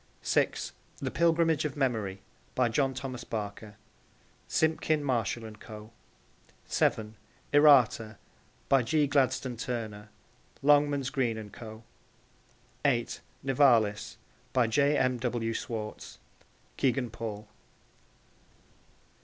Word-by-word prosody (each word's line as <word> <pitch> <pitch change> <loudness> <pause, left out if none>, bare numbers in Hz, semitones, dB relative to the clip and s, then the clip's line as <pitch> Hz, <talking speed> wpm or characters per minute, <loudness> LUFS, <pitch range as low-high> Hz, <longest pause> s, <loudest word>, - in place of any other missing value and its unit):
(6) - - +1 0.3
The - - -3
Pilgrimage 165 -1 +2
of 150 -1 -3
Memory. 110 -8 -1 0.3
By 125 -2 +3
John 135 +3 +1
Thomas 130 -1 -5
Barker. 105 -1 -6 0.7
(Simpkin, 160 -1 +1
Marshall 120 -4 -1
and 110 -1 -10
Co.) 110 -1 -10 0.7
(7) 110 -1 0 0.4
Errata. 125 -7 +5 0.5
By 135 -1 +5
G. 145 +6 +2
Gladstone 135 -3 +1
Turner. 110 -3 -5 0.5
(Longmans, 145 -2 +3
Green 125 -6 0
and 105 -2 -8
Co.) 110 -1 -10 1.0
(8) 120 -5 +1 0.2
Nivalis. 120 -6 +3 0.4
By 125 -2 +4
J. 140 +5 +2
M. 130 -1 +1
W. 115 -2 -1
Schwartz. 110 -2 -5 0.6
(Kegan 125 -2 +1
Paul.) 110 -2 -6
120 Hz, 100 wpm, -29 LUFS, 110-140 Hz, 1.0 s, Errata